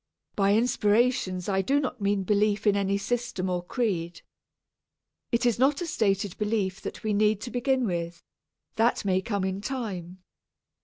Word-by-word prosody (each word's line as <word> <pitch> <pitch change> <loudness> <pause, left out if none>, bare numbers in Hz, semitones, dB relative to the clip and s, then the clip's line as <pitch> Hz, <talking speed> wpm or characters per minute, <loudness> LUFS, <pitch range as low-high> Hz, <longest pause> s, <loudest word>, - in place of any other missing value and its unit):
By 200 0 +3
inspirations 220 -5 +1
I 195 -1 +1
do 275 +9 +2
not 255 -4 -4
mean 200 -1 +1
belief 210 +2 +1
in 205 -1 +4
any 200 0 +1
system 200 -3 -2
or 175 -1 -1
creed. 175 -5 -2 1.1
It 240 0 +1
is 235 -2 +2
not 275 +3 +3
a 350 - -2
stated 200 - 0
belief 210 -3 -1
that - - -7
we 215 -1 0
need 210 0 +3
to 240 - -6
begin 255 +1 +1
with; 170 -3 -3 0.5
that 225 -1 +2
may 190 -1 +2
come 200 -1 -2
in 190 +1 -2
time. 190 -7 -5
205 Hz, 160 wpm, -27 LUFS, 190-240 Hz, 1.1 s, in